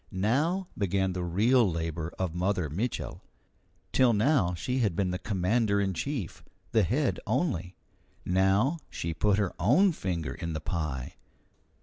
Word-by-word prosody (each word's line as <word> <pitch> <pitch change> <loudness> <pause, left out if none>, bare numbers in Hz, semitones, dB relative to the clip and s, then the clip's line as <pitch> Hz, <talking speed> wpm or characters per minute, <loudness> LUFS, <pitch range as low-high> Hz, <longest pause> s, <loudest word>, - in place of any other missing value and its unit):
Now 145 - +1
began 95 -1 0
the 90 -1 -3
real 110 +6 +3
labour 80 0 -3
of 90 -4 -2
Mother 90 -3 -1
Mitchel. 110 +10 -3 0.7
Till 125 -3 +4
now 105 - +2
she 125 +10 -2
had 105 -8 +1
been 95 -1 0
the 90 - -3
commander 100 +2 +1
in 95 -1 0
chief 95 - -4 0.3
the 110 - +4
head 125 - +1
only; 110 - -1 0.5
now 95 - +2
she 85 0 -3
put 100 +4 +2
her 100 -4 0
own 150 - +4
finger 90 - -3
in 85 -1 -5
the 80 - -2
pie. 75 -5 -4
95 Hz, 145 wpm, -29 LUFS, 85-120 Hz, 0.7 s, Till